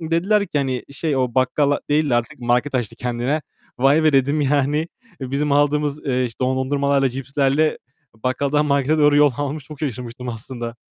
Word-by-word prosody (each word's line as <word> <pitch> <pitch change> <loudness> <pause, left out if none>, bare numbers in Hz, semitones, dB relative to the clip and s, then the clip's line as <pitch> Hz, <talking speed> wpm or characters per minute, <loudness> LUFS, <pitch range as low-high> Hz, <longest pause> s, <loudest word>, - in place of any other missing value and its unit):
Dediler 180 +6 +1
ki 150 - -1
hani 130 -3 -2
şey, 140 +1 -2
"O 125 -2 0
bakkal 140 +3 +2
değil 150 -1 +2
de - - +3
artık 120 0 -2
market 125 +3 0
açtı 120 -5 -2
kendine." 125 +5 -2 0.4
"Vay 140 +5 +4
be!" 155 - +4
dedim, 140 +3 +2
yani 145 +3 +1 0.3
bizim 140 +3 -1
aldığımız, 145 0 +2
eee, 130 -1 +1
işte 115 -3 -6
dondurmalarla, 135 +2 +1
cipslerle 135 +4 0 0.4
bakkaldan 140 +6 0
markete 140 +2 +2
doğru 145 -1 +5
yollamamış. 145 0 +1
Çok 150 -2 -11
şaşırmıştım 125 -2 -5
aslında. 120 0 -6
140 Hz, 160 wpm, -21 LUFS, 130-150 Hz, 0.4 s, doğru